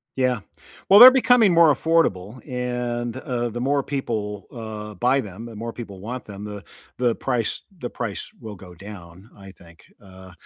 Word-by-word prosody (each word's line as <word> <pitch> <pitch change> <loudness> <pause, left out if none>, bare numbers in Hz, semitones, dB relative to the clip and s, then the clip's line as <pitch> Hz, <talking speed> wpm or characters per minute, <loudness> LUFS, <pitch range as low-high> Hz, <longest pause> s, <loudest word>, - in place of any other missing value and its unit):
Yeah, 125 -4 0 0.5
well 200 - +9
they're 250 +2 +13
becoming 245 -5 +4
more 165 -3 +6
affordable 130 - 0
and, 125 -1 -3
uh, 120 -2 -3
the 120 +2 -6
more 140 +3 +1
people, 110 -7 -4
uh, 110 -2 -7
buy 125 +7 +1
them, 105 +2 -9
the 115 -2 -10
more 115 +2 -6
people 100 -6 -9
want 120 +3 -6
them, 100 -1 -9
the 105 -1 -8 0.4
the 120 -2 +1
price 120 -4 -2 0.2
the 120 - -5
price 115 -5 -5
will 110 -3 -9
go 90 -1 -14
down, 95 +1 -12
I 100 -1 -13
think, 85 -3 -19 0.2
uh, 95 -1 -14
115 Hz, 170 wpm, -23 LUFS, 100-125 Hz, 0.5 s, they're